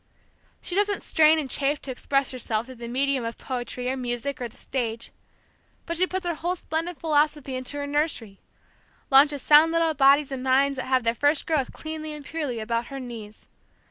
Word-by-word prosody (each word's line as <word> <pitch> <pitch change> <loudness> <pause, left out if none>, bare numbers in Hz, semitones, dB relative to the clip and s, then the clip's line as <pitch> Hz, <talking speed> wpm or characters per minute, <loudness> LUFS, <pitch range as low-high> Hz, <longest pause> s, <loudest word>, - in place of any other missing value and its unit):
She - - -3
doesn't 405 +1 +1
strain 315 0 +4
and 300 -3 -2
chafe 280 +2 +1
to 270 - -5
express 275 +2 -1
herself 230 -3 -1
through 260 - -10
the 235 - -5
medium 265 +1 0
of 230 0 -5
poetry 250 -1 -5
or 260 - 0
music 250 +2 -3
or 245 - -2
the 230 - -17
stage, 230 -3 -4 0.7
but 335 - -3
she 365 +2 +2
puts 375 0 -4
her 345 - 0
whole 345 +3 -2
splendid 330 0 -4
philosophy 295 -3 0
into 255 +3 -3
her 285 - -3
nursery 285 -9 -2 0.7
launches 280 0 +6
sound 305 +2 +6
little 330 -1 +2
bodies 280 0 +4
and 265 -1 -4
minds 270 +1 +2
that 260 - -3
have 260 -1 +2
their 230 0 +2
first 290 +5 +1
growth 300 -5 0
cleanly 310 -1 -6
and 295 -1 -9
purely 295 -8 -3
about 230 +2 -2
her 275 -1 -7
knees. 225 -4 -9
275 Hz, 195 wpm, -25 LUFS, 250-310 Hz, 0.7 s, launches